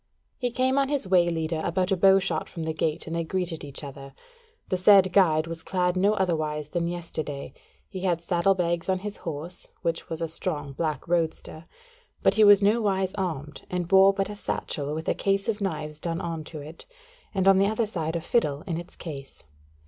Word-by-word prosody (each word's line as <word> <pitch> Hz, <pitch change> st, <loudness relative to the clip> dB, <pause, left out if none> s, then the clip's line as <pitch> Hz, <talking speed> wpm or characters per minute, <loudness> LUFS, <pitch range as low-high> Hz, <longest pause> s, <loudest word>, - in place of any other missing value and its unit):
He 250 Hz, -2 st, 0 dB
came 260 Hz, +3 st, +1 dB
on 275 Hz, -1 st, +1 dB
his 285 Hz, -8 st, -1 dB
way 180 Hz, -2 st, +4 dB
leader 160 Hz, -1 st, -2 dB
about 185 Hz, +3 st, 0 dB
a -, -, +4 dB
bowshot 190 Hz, -3 st, +3 dB
from 165 Hz, -, -6 dB
the 160 Hz, 0 st, -2 dB
gate 155 Hz, +1 st, -1 dB
and 165 Hz, -, -4 dB
they 170 Hz, -, 0 dB
greeted 175 Hz, -1 st, -3 dB
each 140 Hz, +1 st, -6 dB
other: 135 Hz, -1 st, -9 dB, 0.5 s
the 185 Hz, -, +1 dB
said 190 Hz, 0 st, +6 dB
guide 160 Hz, -5 st, +4 dB
was 165 Hz, 0 st, -6 dB
clad 180 Hz, 0 st, 0 dB
no 200 Hz, +3 st, +3 dB
otherwise 155 Hz, -6 st, -1 dB
than 170 Hz, +1 st, -1 dB
yesterday: 160 Hz, -5 st, -5 dB, 0.3 s
he 190 Hz, -, -7 dB
had 180 Hz, -3 st, 0 dB
saddle 175 Hz, +3 st, +2 dB
bags 170 Hz, 0 st, -1 dB
on 190 Hz, -, +2 dB
his 210 Hz, 0 st, -4 dB
horse, 165 Hz, +2 st, -6 dB, 0.2 s
which 165 Hz, -1 st, -2 dB
was 160 Hz, -, -4 dB
a 165 Hz, -, -1 dB
strong 150 Hz, -3 st, -3 dB
black 155 Hz, -1 st, -3 dB
roadster: 165 Hz, -1 st, -2 dB, 0.6 s
but -, -, +5 dB
he 215 Hz, +1 st, +4 dB
was 205 Hz, -1 st, +7 dB
nowise 200 Hz, -3 st, +2 dB
armed, 155 Hz, -7 st, -4 dB
and 180 Hz, -1 st, -2 dB
bore 190 Hz, +1 st, +7 dB
but 195 Hz, +1 st, -2 dB
a -, -, -6 dB
satchel 150 Hz, -7 st, -3 dB
with 160 Hz, +1 st, -5 dB
a -, -, +3 dB
case 195 Hz, +1 st, 0 dB
of 220 Hz, -2 st, -1 dB
knives 155 Hz, -5 st, -3 dB
done 165 Hz, 0 st, -3 dB
on 165 Hz, -3 st, -4 dB
to 155 Hz, -, -8 dB
it, 150 Hz, +3 st, -11 dB, 0.5 s
and 190 Hz, 0 st, +1 dB
on 195 Hz, -1 st, +7 dB
the 195 Hz, -, +4 dB
other 220 Hz, +2 st, 0 dB
side 165 Hz, -6 st, -3 dB
a 170 Hz, -, -1 dB
fiddle 150 Hz, -7 st, 0 dB
in 170 Hz, -4 st, -3 dB
its 175 Hz, -, -11 dB
case. 140 Hz, -5 st, -9 dB
175 Hz, 205 wpm, -26 LUFS, 160-195 Hz, 0.6 s, was